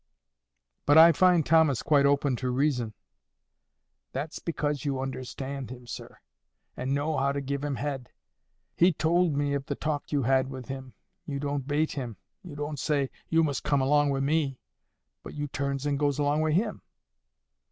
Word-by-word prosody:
"But 145 Hz, +2 st, +6 dB
I 165 Hz, +1 st, +10 dB
find 175 Hz, -1 st, +4 dB
Thomas 160 Hz, -5 st, +4 dB
quite 140 Hz, -2 st, +4 dB
open 140 Hz, -2 st, +2 dB
to 130 Hz, 0 st, -2 dB
reason." 125 Hz, -4 st, 0 dB, 1.2 s
"That's 145 Hz, +4 st, -4 dB
because 150 Hz, -3 st, -2 dB
you 140 Hz, -3 st, -1 dB
understand 135 Hz, +1 st, -5 dB
him, 125 Hz, -1 st, -9 dB
sir, 120 Hz, -, -8 dB, 0.6 s
and 130 Hz, +2 st, -1 dB
know 150 Hz, +2 st, -1 dB
how 140 Hz, +1 st, +2 dB
to 140 Hz, -, -2 dB
give 140 Hz, +1 st, -3 dB
him 145 Hz, -2 st, -1 dB
head. 135 Hz, -2 st, -4 dB, 0.7 s
He 175 Hz, +1 st, +4 dB
tould 160 Hz, 0 st, +2 dB
me 145 Hz, 0 st, 0 dB
of 140 Hz, -1 st, -3 dB
the -, -, -2 dB
talk 150 Hz, -2 st, -3 dB
you 145 Hz, -3 st, +1 dB
had 130 Hz, +1 st, +2 dB
with 130 Hz, -2 st, -8 dB
him. 130 Hz, -1 st, -7 dB, 0.3 s
You 140 Hz, -1 st, -3 dB
don't 140 Hz, -1 st, -3 dB
bait 150 Hz, +2 st, +1 dB
him. 125 Hz, -7 st, -5 dB, 0.2 s
You 170 Hz, -6 st, -10 dB
don't 145 Hz, 0 st, -4 dB
say, 140 Hz, -2 st, 0 dB, 0.2 s
'You 165 Hz, 0 st, +4 dB
must 145 Hz, -3 st, -1 dB
come 145 Hz, -, +2 dB
along 145 Hz, +2 st, +3 dB
wi' 135 Hz, -1 st, 0 dB
me,' 140 Hz, -2 st, +1 dB, 0.6 s
but -, -, -10 dB
you 145 Hz, 0 st, -3 dB
turns 140 Hz, 0 st, -3 dB
and 140 Hz, -1 st, 0 dB
goes 145 Hz, -2 st, +1 dB
along 145 Hz, +1 st, +1 dB
wi' 155 Hz, -1 st, +1 dB
him. 210 Hz, +5 st, 0 dB
145 Hz, 175 wpm, -28 LUFS, 135-150 Hz, 1.2 s, I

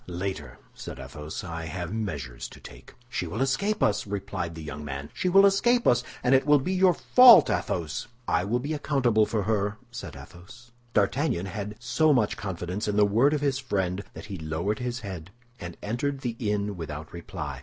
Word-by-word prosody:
"Later," 95 Hz, +2 st, -5 dB, 0.2 s
said -, -, -8 dB
Athos. 75 Hz, +1 st, -7 dB
"I 85 Hz, -2 st, -5 dB
have 85 Hz, +3 st, -5 dB
measures 75 Hz, -, -4 dB
to -, -, -14 dB
take." 60 Hz, 0 st, -13 dB
"She 90 Hz, -7 st, -3 dB
will 100 Hz, +7 st, -5 dB
escape 165 Hz, +11 st, +1 dB
us," 105 Hz, 0 st, +1 dB
replied 100 Hz, -4 st, -4 dB
the 80 Hz, -, -8 dB
young 75 Hz, 0 st, -7 dB
man; 70 Hz, 0 st, -6 dB
"she 185 Hz, -, -1 dB
will 195 Hz, +2 st, +7 dB
escape 240 Hz, +5 st, +3 dB
us, 120 Hz, 0 st, +4 dB, 0.2 s
and 125 Hz, -, +3 dB
it 135 Hz, +2 st, +4 dB
will 145 Hz, 0 st, +7 dB
be 150 Hz, +8 st, -2 dB
your 185 Hz, -2 st, +4 dB
fault, 250 Hz, -2 st, +8 dB
Athos." 85 Hz, -1 st, -2 dB, 0.2 s
"I -, -, +2 dB
will 110 Hz, +6 st, 0 dB
be 145 Hz, +5 st, -3 dB
accountable 130 Hz, -7 st, +2 dB
for 110 Hz, -3 st, -1 dB
her," 105 Hz, 0 st, 0 dB
said 120 Hz, -, -7 dB
Athos. 115 Hz, +8 st, -13 dB, 0.2 s
D'Artagnan 105 Hz, -, +1 dB
had 105 Hz, +1 st, -5 dB
so 125 Hz, +6 st, +3 dB
much 115 Hz, -6 st, +2 dB
confidence 95 Hz, +1 st, -4 dB
in 105 Hz, 0 st, 0 dB
the 105 Hz, -, +6 dB
word 120 Hz, +9 st, +3 dB
of 145 Hz, -, -2 dB
his 140 Hz, -2 st, +1 dB
friend 95 Hz, -6 st, -2 dB
that -, -, -9 dB
he 100 Hz, -4 st, -7 dB
lowered 80 Hz, +7 st, -2 dB
his 125 Hz, -1 st, -3 dB
head, 95 Hz, -5 st, -7 dB, 0.3 s
and 85 Hz, -1 st, -8 dB
entered 135 Hz, +6 st, -2 dB
the 120 Hz, -3 st, -3 dB
inn 105 Hz, -2 st, -1 dB
without 80 Hz, -2 st, -7 dB
reply. 85 Hz, -5 st, -6 dB
105 Hz, 195 wpm, -27 LUFS, 85-130 Hz, 0.3 s, fault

